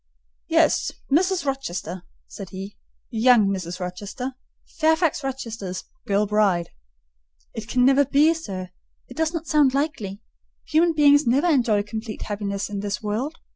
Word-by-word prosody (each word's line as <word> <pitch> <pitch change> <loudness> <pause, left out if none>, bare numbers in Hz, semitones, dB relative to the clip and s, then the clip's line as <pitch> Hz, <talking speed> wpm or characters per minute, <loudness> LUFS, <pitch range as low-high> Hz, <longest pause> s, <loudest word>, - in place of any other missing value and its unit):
"Yes, - - +3 0.2
Mrs. 360 +3 +2
Rochester," 185 - -3 0.3
said 195 -3 -9
he; 195 +2 -8 0.4
"young 230 -2 +5
Mrs. 180 -2 -4
Rochester—Fairfax 265 - -2
Rochester's 230 -8 -5 0.2
girl 205 +1 +2
bride." 200 -5 +1 0.8
"It 220 -1 -6
can 250 0 +2
never 275 +2 +5
be, 290 +4 +4
sir; 190 - -6 0.4
it - - -12
does 320 0 +1
not 330 -1 -4
sound 290 -4 +3
likely. 225 -10 -2 0.5
Human 330 +2 +3
beings 290 -2 +5
never 265 +7 +3
enjoy 240 -11 +3
complete 220 +1 -6
happiness 205 -1 -3
in 205 -1 -5
this 205 +2 -3
world. 235 +10 -2
235 Hz, 135 wpm, -23 LUFS, 200-290 Hz, 0.8 s, young